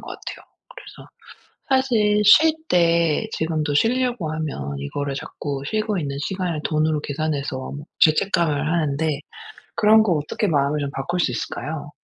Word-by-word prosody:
것 - - -13
같아요. - - -8 0.3
그래서 - - -12 0.6
사실 225 -6 +3
쉴 315 +10 +7 0.2
때 170 -2 +2
지금도 155 -2 -1
쉬려고 240 - +1
하면 140 - -4
이거를 140 - -4
자꾸 140 0 -5
쉬고 215 +3 -1
있는 140 -2 -4
시간을 180 -2 -3
돈으로 155 -1 +1
계산해서 145 -3 -3 0.3
죄책감을 155 -2 +2
하는데 155 -2 0 0.6
그런 220 +1 +5
거 200 -5 +2
어떻게 150 +7 -2
마음을 145 -2 +1
좀 140 -1 -2
바꿀 175 +7 -3
수 130 - +1
있을까요? 145 +5 -5
155 Hz, 310 characters per minute, -22 LUFS, 145-195 Hz, 0.6 s, 쉴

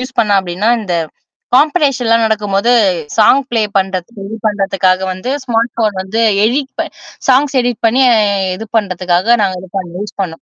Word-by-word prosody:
Use 255 +1 -7
பண்ணேன் 205 -2 +3
அப்பிடின்னா, 190 +3 -2
இந்த 185 -5 -3 0.6
காம்படிஷன்லாம் 265 -6 +2
நடக்கும்போது 210 +1 0 0.5
சாங் 245 +6 +5
ப்ளே 230 -2 +1 0.2
பண்றது, 190 -2 -2 0.2
இது 220 +2 -6
பண்றதுக்காக 195 -2 +1
வந்து 185 +8 -4
ஸ்மார்ட் 230 -1 0
ஃபோன் 215 -3 0
வந்து 200 +4 -3 0.2
எடிட் 265 +4 0
ப - - -2 0.4
சாங்ஸ் 270 +2 +3
எடிட் 245 -1 -3
பண்ணி 250 +4 +3 0.5
இது 220 +4 -8
பண்றதுக்காக 185 +2 +1
நாங்க 190 -2 0
இது 190 - -13
பண்ண 185 - -5
யூஸ் 205 0 -7
பண்ணோம். 165 -3 -6
215 Hz, 155 wpm, -14 LUFS, 190-245 Hz, 0.6 s, சாங்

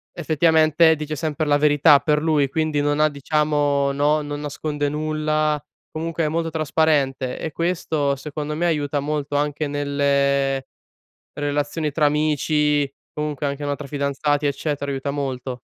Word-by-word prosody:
effettivamente 160 0 +4
dice 155 0 -5
sempre 155 +1 -2
la 145 -1 +3
verità, 145 -1 +5
per 150 +1 +1
lui, 150 -4 +2
quindi 155 0 0
non 145 0 0
ha 155 0 +4
diciamo 145 -1 +1
no, 145 +2 +2
non 145 0 -5
nasconde 145 0 -3
nulla, 155 0 -1 0.3
comunque 165 +1 -3
è - - +1
molto 165 +1 -1
trasparente 150 -4 0
e 160 - -4
questo 160 -4 -1
secondo 150 +2 -5
me 170 +3 -1
aiuta 145 -3 0
molto, 145 0 -3
anche 145 +1 0
nelle 140 -1 +1 0.7
relazioni 145 +1 -2
tra 150 +1 +1
amici, 150 -1 +1 0.2
comunque 150 -1 -3
anche, 140 +1 -4
no, 145 0 -1
tra 145 - -9
fidanzati, 145 +1 -1
eccetera 140 0 -2
aiuta 135 +1 -3
molto. 130 -3 -4
145 Hz, 145 wpm, -22 LUFS, 140-155 Hz, 0.7 s, verità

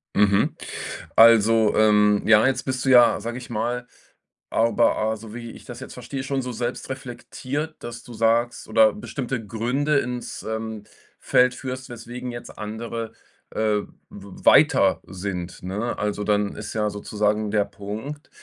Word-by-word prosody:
Mhm. 100 -1 +3 0.6
Also, 115 -1 +6
ähm, 105 -1 +4
ja, 110 +1 +6
jetzt 135 - 0
bist 130 -1 -3
du - - +2
ja, 120 -2 +6
sage 120 +3 -5
ich 125 - -9
mal, 120 +2 -2 0.6
aber 115 +1 +2
a 110 +1 0
so 110 0 -11
wie 115 -1 -7
ich - - -13
das - - -9
jetzt - - -9
verstehe, 135 -1 -6
schon 135 -1 -1
so 125 0 -5
selbstreflektiert, 130 +4 -5
dass 120 0 -7
du 120 - -11
sagst 115 +2 +1
oder 275 -3 +5
bestimmte 130 - -4
Gründe 130 +7 0
ins, 125 -2 -5
ähm, 110 -1 -4 0.4
Feld 125 0 +3
führst, 130 0 -6
weswegen 120 +1 -7
jetzt 120 - -9
andere, 110 +1 -5 0.4
äh, 105 -1 +1 0.3
w 100 -1 -12
weiter - - +5
sind, 90 -2 -5
ne? 105 +6 -3
Also 105 0 -2
dann 105 -1 +1
ist 105 - -6
ja 105 -1 0
sozusagen 105 +1 -1
der 105 -2 +2
Punkt, 110 +10 -7
115 Hz, 155 wpm, -24 LUFS, 105-125 Hz, 0.6 s, Also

